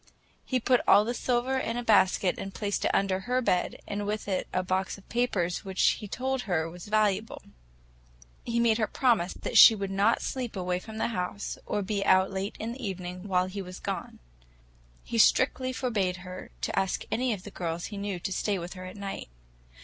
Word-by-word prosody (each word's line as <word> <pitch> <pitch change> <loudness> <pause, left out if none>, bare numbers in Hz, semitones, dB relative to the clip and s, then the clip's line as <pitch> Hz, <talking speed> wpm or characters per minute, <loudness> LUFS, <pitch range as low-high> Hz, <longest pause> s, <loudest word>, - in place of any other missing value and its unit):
He 255 - 0
put 250 +1 +3
all 205 - +7
the 240 - -1
silver 250 +2 0
in 230 -2 -2
a 245 - -2
basket 195 -4 +3
and 195 0 -6
placed 205 -1 -1
it - - +3
under 195 -1 +1
her 250 +6 0
bed, 180 -8 0
and 205 0 -3
with 210 0 -3
it 190 -2 -1
a 185 - 0
box 190 +2 -1
of 195 - -18
papers 200 -8 0
which 190 -1 -1 0.2
he 210 - -7
told 260 +5 -2
her 160 -3 +1
were 175 +2 -10
valuable. 210 +2 0 1.0
He 235 0 -1
made 230 -1 +3
her 220 - +2
promise 225 -10 +1
that - - +2
she 225 - +10
would 195 -2 -4
not 200 +4 +2
sleep 250 -4 -3
away 180 -1 -1
from 220 +3 -9
the 225 - 0
house, 200 -1 -4
or 205 - -1
be 200 0 -1
out 190 0 +4
late 195 +1 -3
in 225 +2 -3
the 255 +2 -8
evening, 180 -1 -5
while 185 -2 +2
he 190 +2 -5
was 185 -1 -8
gone. - - -5 0.9
He 230 - -2
strictly 255 +2 +4
forbade 210 -8 -1
her 185 0 -8
to - - 0
ask 190 -1 -1
any 250 +1 +1
of 200 -4 -3
the 205 - -9
girls 170 -2 -3
she 205 - -7
knew 200 -2 -3
to 190 - -2
stay 200 +1 0
with 175 0 -6
her 185 -1 -8
at 185 +2 -9
night. 195 - -6
200 Hz, 210 wpm, -28 LUFS, 185-230 Hz, 1.0 s, she